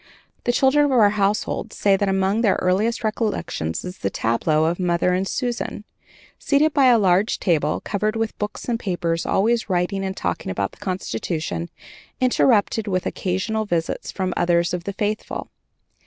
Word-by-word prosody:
The 245 - +3
children 270 +4 +4
of 285 - 0
our 215 -5 +5
household 205 0 -1
say 200 -1 +3
that 195 0 0
among 195 +3 +1
their 210 -5 +3
earliest 210 +7 0
recollections 210 - -2
is 180 0 -7
the 100 - -1
tableau 150 +10 +1
of 170 +3 0
"Mother 180 0 +1
and 185 +2 0
Susan," 240 -3 -3 0.6
seated 300 0 +2
by 275 -2 +5
a 245 -2 +6
large 195 0 +2
table 155 -5 +1
covered 215 +1 -2
with 225 -1 -2
books 210 0 -4
and 235 -2 0
papers, 170 -4 -2
always 225 +2 +1
writing 185 +2 0
and 190 0 -4
talking 85 +1 -3
about 100 +1 -2
the - - -19
Constitution, 155 - -3 0.5
interrupted 230 -4 +2
with 185 -2 -1
occasional 205 +4 -1
visits 170 -4 -2
from 185 -1 -2
others 175 0 +2
of 175 -1 -3
the 200 - -3
faithful. 210 +1 -3
195 Hz, 165 wpm, -22 LUFS, 175-220 Hz, 0.6 s, a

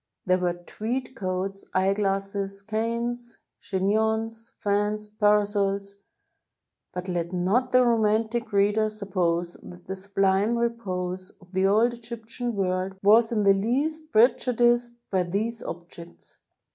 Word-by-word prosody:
There 185 0 +3
were 180 -1 +1
tweed 235 +9 -4
coats, 190 0 -3
eyeglasses, 195 0 0
canes, 235 +2 -3 0.2
chignons, 220 +3 -1
fans, 210 +1 0
parasols 205 -1 +1 0.4
— - - -60
but 180 +1 -5
let 175 -1 -2
not 195 +8 +1
the 255 0 +5
romantic 225 0 +1
reader 205 +2 +3
sup 210 -2 -9
pose 170 -1 0
that 175 0 -12
the 190 - -4
sublime 195 +3 +1
repose 185 -6 -2
of 180 -1 -20
the 190 0 +2
old 225 +4 +3
Egyptian 235 0 -6
world 185 0 -1
was 225 +3 +6
in 215 -3 +1
the 200 0 +6
least 290 +10 -1
prejudiced 240 +1 +3 0.2
by 190 -2 +2
these 215 +6 -2
objects. 170 0 -9
205 Hz, 125 wpm, -26 LUFS, 190-230 Hz, 0.4 s, was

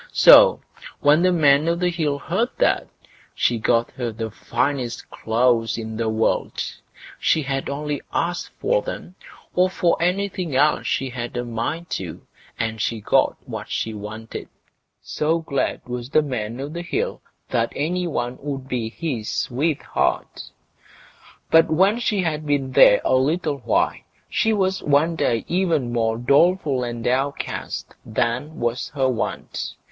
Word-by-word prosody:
So, - - +8 0.4
when 150 +3 +5
the 185 0 +4
Man 150 -2 +4
o' 170 - +2
the 180 +1 0
Hill 155 -4 -1
heard 190 - -1
that, - - +2 0.5
he 120 -2 +1
got 115 +1 +1
her 120 -3 -4
the 110 0 -5
finest 125 +2 -2
clothes 115 0 +1
in 110 -1 -5
the 110 0 -1
world; 110 +1 0 0.6
she 160 - +2
had 135 0 -2
only 145 0 -3
to - - -23
ask 175 +1 -2
for - - +1
them, 180 - -7 0.4
or 180 +1 +3
for 175 -3 +1
anything 180 -3 -1
else 150 +3 +3
she 135 -1 -1
had 120 -1 -5
a 120 - -2
mind 120 +9 -4
to, 90 -4 -5 0.3
and 110 -1 -2
she 115 0 -1
got 105 - +2
what - - -6
she 110 - -2
wanted, 110 +2 -7 0.5
so 160 +2 0
glad 160 -5 -2
was 125 0 -5
the 155 +2 +3
Man 120 -4 -4
o' 140 - -3
the 170 +4 -6
Hill 430 - -2 0.3
that 115 -2 +1
any 175 +5 -1
one 120 -5 -3
would 135 -2 -5
be 120 -4 -2
his 120 -4 -4
sweetheart. 145 +4 -1 1.0
But 165 0 +6
when 190 +8 +3
she 210 -5 0
had 155 -2 -2
been 140 -2 0
there 105 -5 +7
a - - +2
little 150 +3 +1
while, - - +1 0.3
she 225 - +2
was 190 -3 +1
one 150 +4 +2
day 115 -7 0
even 165 -9 0
more 115 -1 +1
doleful 140 +1 +3
and 120 -1 -4
downcast 135 +4 -2
than 125 +7 -2
was 120 +1 -1
her 135 -2 +2
wont. 125 -3 -3
140 Hz, 155 wpm, -22 LUFS, 120-165 Hz, 1.0 s, So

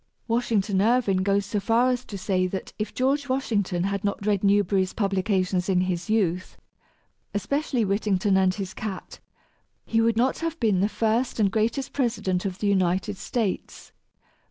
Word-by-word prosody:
Washington 220 -4 +1
Irving 225 -3 +2
goes 200 +1 +1
so 205 +1 -2
far 230 +5 +2
as 250 0 -2
to 200 - -7
say 185 -1 0
that 190 +1 -6
if 215 - -2
George 275 +2 0
Washington 205 -9 0
had 200 +1 -2
not 200 0 -2
read 205 -2 +1
Newberry's 195 -2 +2
publications 190 -2 0
in 180 -1 +3
his 180 +1 -2
youth, 185 -5 0 0.8
especially 260 +2 0
"Whittington 195 -1 +1
and 190 -1 +4
his 195 -2 -5
Cat," 205 -4 -6 0.7
he 225 0 +1
would 230 -1 +2
not 255 +3 +1
have 330 0 -3
been 215 -6 +2
the 200 +3 +2
first 225 +3 0
and 200 -3 +3
greatest 230 +5 -1
President 210 -9 -1
of 190 -2 -3
the 205 - -2
United 190 +1 +1
States! 205 +1 -3
205 Hz, 160 wpm, -25 LUFS, 190-230 Hz, 0.8 s, and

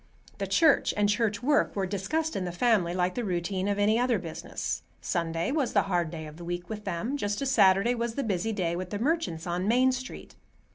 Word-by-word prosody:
The - - -2
church 320 -4 +3
and 205 0 +3
church 210 +1 0
work 290 +2 +2
were 195 -2 0
discussed 295 - -2
in 190 - -1
the 180 - -3
family 195 -2 +2
like 180 0 +1
the 245 - -3
routine 185 0 -1
of 200 0 0
any 210 +3 +3
other 245 -2 +2
business. 165 -4 -4 0.2
Sunday 165 - -1
was 280 -5 0
the 200 - +4
hard 175 -3 0
day 160 -1 -6
of 155 0 -10
the 175 - -9
week 175 +1 -5
with 210 -1 -6
them, 200 +9 -2
just 205 -5 -2
as 275 -1 -1
Saturday 195 0 +5
was 235 -1 -2
the 280 - -1
busy 205 0 -1
day 175 -5 -1
with 180 +1 -4
the 205 - -3
merchants 245 - -1
on 180 +2 -2
Main 255 +3 +4
Street. 255 0 -7
205 Hz, 225 wpm, -28 LUFS, 175-240 Hz, 0.2 s, Saturday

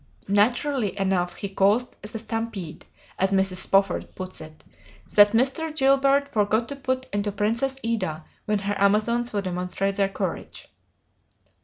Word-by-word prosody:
Naturally 240 +1 +1
enough 180 -2 0
"he 200 - -4
caused 200 +6 +1
the 210 +2 -6
stampede," 220 -7 -5 0.3
as 190 +1 +2
Mrs. 190 -1 +1
Spofford 195 -1 +1
puts 185 0 -7
it, 155 0 -12 0.5
"that 205 0 +7
Mr. 275 +6 +1
Gilbert 275 0 +3
forgot 215 +2 +1
to 280 - -4
put 260 -1 -2
into 205 0 0
'Princess 230 +7 -1
Ida' 185 -9 -2 0.2
when 210 0 +1
her 200 0 -2
Amazons 215 +4 +2
wild 200 -2 -2
demonstrate 185 +2 -2
their 195 -1 +2
courage." - - -6
210 Hz, 140 wpm, -24 LUFS, 195-240 Hz, 0.5 s, that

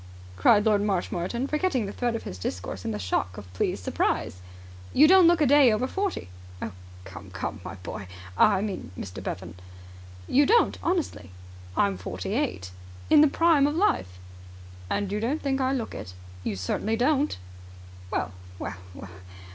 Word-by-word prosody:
cried 205 - +4
Lord 210 -2 +3
Marshmoreton, 195 +3 -1
forgetting 300 - 0
the 200 - -5
thread 240 +1 -1
of 230 - -4
his 90 - -7
discourse 90 +1 -5
in - - -3
the 105 - -2
shock 90 -2 -2
of 90 -2 -10
pleased 90 - -1
surprise. 90 - -1 0.5
"You 300 +3 +7
don't 370 0 +7
look 345 -1 +4
a - - +5
day 280 -2 +6
over 215 +4 +1
forty." 385 - -3 0.3
"Oh, 110 - -4 0.3
come, 95 0 -10
come, 95 -1 -5
my 90 - -7
boy!... 90 +1 -7 0.3
I 200 - +4
mean, 205 - -4
Mr. 90 -2 -7
Bevan." 85 -2 -5 0.7
"You 285 +2 +4
don't 470 +3 +3
honestly." 340 - -2 0.5
"I'm 100 -2 +2
forty 90 - -4
eight." 90 0 -2 0.4
"The 305 0 +7
Prime 310 -1 +4
of 295 - -1
Life." 95 - +1 0.7
"And 200 - -1
you 210 - -1
don't 255 +8 -1
think 270 -1 0
I 260 0 +2
look 250 -5 -2
it?" 90 - -8 0.3
"You - - -2
certainly 95 - -1
don't." 280 +5 +1 0.7
"Well, 95 - -2 0.3
well, 95 0 -5 0.2
well! 100 - -9
210 Hz, 165 wpm, -26 LUFS, -, 0.7 s, You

